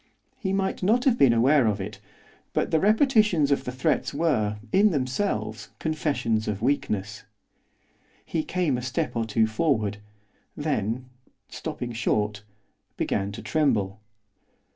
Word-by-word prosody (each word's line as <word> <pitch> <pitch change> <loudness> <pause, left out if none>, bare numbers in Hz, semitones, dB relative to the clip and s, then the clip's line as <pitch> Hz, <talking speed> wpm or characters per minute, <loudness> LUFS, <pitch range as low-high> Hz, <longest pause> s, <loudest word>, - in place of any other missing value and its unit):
He 190 - -2
might 195 0 -1
not 225 +7 +2
have 260 -4 +4
been 135 - +5
aware 125 +3 +4
of 105 -1 0
it, 100 +1 -6 0.5
but - - 0
the 160 - +3
repetitions 210 - +3
of 140 - +1
the 125 - -3
threats 130 +2 0
were, 115 -10 +1
in 205 +2 +5
themselves, 145 +5 -2
confessions 140 -8 -1
of 105 -2 -2
weakness. 105 -6 -1 1.0
He 160 - -1
came 160 -9 0
a - - -6
step 125 -1 -2
or 115 -1 0
two 110 0 +2
forward, 110 -3 0 0.6
then, 130 -5 -1 0.4
stopping 120 -1 -5
short, 105 -3 0 0.6
began 100 +1 -1
to - - -8
tremble. 110 -11 +1
130 Hz, 135 wpm, -26 LUFS, 110-160 Hz, 1.0 s, been